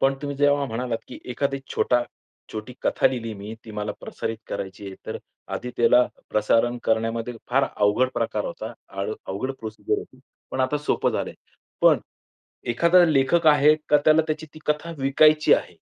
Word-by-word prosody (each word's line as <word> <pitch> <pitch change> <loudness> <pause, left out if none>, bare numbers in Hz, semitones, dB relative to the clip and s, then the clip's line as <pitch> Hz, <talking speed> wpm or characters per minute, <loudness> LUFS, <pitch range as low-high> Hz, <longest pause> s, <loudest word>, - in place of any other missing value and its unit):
पण, 135 0 +3
तुम्ही 145 -1 -3
जेव्हा 145 0 +3
म्हणालात, 115 -1 -2
की - - -9
एखादी 140 +2 -1 0.2
छोटा 120 -1 +2 0.5
छोटी 110 +3 -6
कथा - - +3
लिहिली 115 -3 -2
मी, 105 +2 -7
ती 110 - -10
मला 105 0 -3
प्रसारित 115 -1 -5
करायची 95 +1 -5
आहे. 95 - -7
तर - - -4 0.4
आधी 125 - -4
त्याला 120 +1 +5 0.3
प्रसारण 115 +3 +2
करण्यामध्ये 115 +2 0 0.2
फार 135 +2 +4
अवघड 105 +5 +3
प्रकार 110 -2 -1
होता, 110 +6 -5 0.2
अळ 100 +2 -3
अवघड 105 +8 -3
प्रोसिजर 110 -1 -2
होती, - - -11 0.3
पण - - -2
आता 130 +3 +1
सोपं 150 - 0
झालंय. - - -3 0.5
पण - - +6 0.7
एखादा 170 +8 +5
लेखक 155 +2 +3
आहे 150 0 +6
का 150 - +6
त्याला 155 +1 +6
त्याची 155 0 -2
ती 155 - -11
कथा 150 +3 -1
विकायची 150 +3 +5
आहे. - - -1
125 Hz, 165 wpm, -24 LUFS, 110-145 Hz, 0.7 s, पण